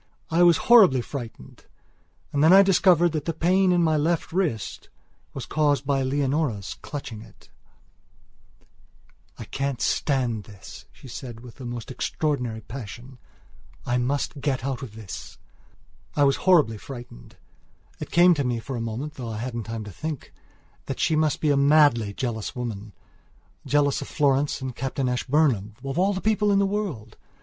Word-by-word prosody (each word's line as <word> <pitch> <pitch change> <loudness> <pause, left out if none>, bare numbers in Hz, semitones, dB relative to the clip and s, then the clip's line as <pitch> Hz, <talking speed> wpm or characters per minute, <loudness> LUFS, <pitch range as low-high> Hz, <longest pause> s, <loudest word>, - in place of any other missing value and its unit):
I 165 +2 +3
was 175 -2 +6
horribly 200 - +7
frightened 120 - -9 0.7
and 145 +1 +2
then 160 - +6
I 195 +1 +9
discovered 180 -3 +4
that 150 -2 -3
the 165 - -2
pain 185 +3 +3
in 175 -1 +3
my 160 -1 +2
left 160 +2 -1
wrist 165 - -2 0.4
was - - -6
caused 145 -2 +1
by 135 -1 +1
Leonora's 135 -5 -1
clutching 130 -7 -7
it: - - -18 1.9
"I - - -7
can't 135 -2 -3
stand 125 -7 0
this," 100 -4 -12
she - - -15
said 120 -2 -8
with 125 +2 -13
a - - -7
most 120 0 -6
extraordinary 125 -5 -2
passion; 125 +2 -9 0.7
"I 125 +1 +1
must 140 +3 -2
get 135 -3 -1
out 135 -2 -3
of 115 -6 -8
this." 110 -5 -9 0.8
I 145 - +3
was 140 -1 +3
horribly 150 - +4
frightened. 120 - -11 0.6
It - - -6
came 175 +1 +6
to 145 -4 -1
me 125 -2 -1
for 130 +3 -6
a 115 - -3
moment, 115 +7 -4
though 125 -5 -7
I 110 - -5
hadn't 115 -1 -4
time 115 -1 -5
to 105 - -9
think 155 - -5
it, - - -20 0.6
that - - -4
she 160 - +2
must 155 -1 +1
be 150 - +2
a - - +3
madly 140 -6 +4
jealous 110 0 -4
womanjealous 115 +3 -4
of - - -6
Florence 140 0 +1
and 130 -2 -5
Captain 135 0 -2
Ashburnham, 125 -5 +1
of 135 +4 -3
all 190 +1 +2
people 210 0 +1
in 200 - +3
the 200 - +3
world! 185 - -4
135 Hz, 165 wpm, -25 LUFS, 115-155 Hz, 1.9 s, I